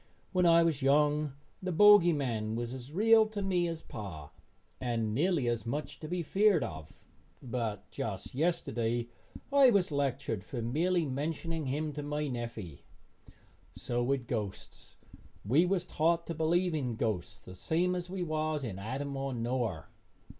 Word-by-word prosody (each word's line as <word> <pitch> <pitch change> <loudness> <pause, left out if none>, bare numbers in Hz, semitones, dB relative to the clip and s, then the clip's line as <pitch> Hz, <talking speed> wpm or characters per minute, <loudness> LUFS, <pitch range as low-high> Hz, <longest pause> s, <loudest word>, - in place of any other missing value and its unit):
When 180 -2 +3
I 170 0 +6
was 160 -4 0
young 145 +1 +3 0.3
the 185 -1 -2
bogey 205 0 +7
man 115 -7 -1
was 120 +1 -3
as 130 +1 -8
real 220 +5 +5
to 215 -1 -5
me 180 -3 +1
as 165 -1 -5
pa 80 -9 -8 0.5
and 115 -3 -1
nearly 155 - +1
as 120 -2 0
much 145 +6 -4
to 155 - -7
be 175 +1 -2
feared 195 -1 +3
of, 80 -2 -8 0.4
but 115 -6 -4
just 100 -4 -5
yesterday 120 -6 -1 0.4
I 275 -2 +7
was 200 -7 +2
lectured 135 -7 -1
for 120 - -6
merely 165 +9 +1
mentioning 155 +3 -3
him 150 +3 -2
to 150 - -4
my 150 +1 -2
neffy. 115 - -6 0.9
So 120 0 -2
with 130 0 0
ghosts. 105 -5 -6 0.5
We 145 - +4
was 180 -1 0
taught 170 0 +1
to 170 - -4
believe 170 +3 +1
in 130 -7 -2
ghosts 110 -6 -2
the 90 - -12
same 170 - 0
as 180 -1 -4
we 185 -1 -3
was 155 -2 -1
in 100 -6 -5
Adam 135 +7 -4
or 135 0 -3
Noar. 115 - -2
145 Hz, 160 wpm, -31 LUFS, 120-170 Hz, 0.9 s, bogey